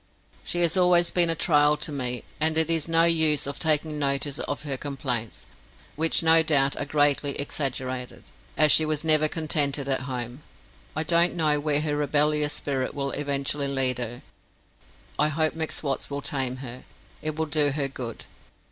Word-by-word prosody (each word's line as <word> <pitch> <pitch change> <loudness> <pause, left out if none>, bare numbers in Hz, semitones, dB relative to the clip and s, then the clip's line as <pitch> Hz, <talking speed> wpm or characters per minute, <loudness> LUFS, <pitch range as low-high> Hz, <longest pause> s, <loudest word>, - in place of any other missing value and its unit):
She 175 - -2
has 170 -2 +2
always 180 -2 +3
been 175 -2 +5
a 165 - +2
trial 150 -2 +3
to 150 +1 -4
me, 125 -4 -3 0.2
and 160 +1 +1
it 160 0 +2
is 165 -1 +1
no 165 0 +3
use 160 -3 +3
of 140 0 -6
taking 155 -1 0
notice 140 0 -1
of 145 - -4
her 140 -3 -3
complaints, 130 -5 -4 0.5
which 165 +2 +2
no 165 0 +6
doubt 140 -3 +2
are - - -2
greatly 145 -1 +1
exaggerated, 130 -3 -3 0.3
as 155 -1 +5
she 160 - +6
was 155 -1 -2
never 155 -1 +3
contented 145 -3 -1
at 135 -1 0
home. 125 +1 -5 0.5
I 155 - -1
don't 170 +2 +3
know 155 -3 +2
where 150 0 0
her 150 -1 -2
rebellious 150 +1 +1
spirit 135 -3 -3
will 140 -1 -2
eventually 140 0 -2
lead 130 -2 -1
her. 120 0 -6 1.0
I - - +4
hope 155 +1 0
M'Swat's 155 -3 -2
will 140 0 -4
tame 130 -3 -2
her; 125 +1 -9 0.4
it 155 -1 -4
will 160 0 -1
do 150 -1 +2
her 140 0 -2
good. 125 -4 -8
150 Hz, 175 wpm, -25 LUFS, 140-155 Hz, 1.0 s, no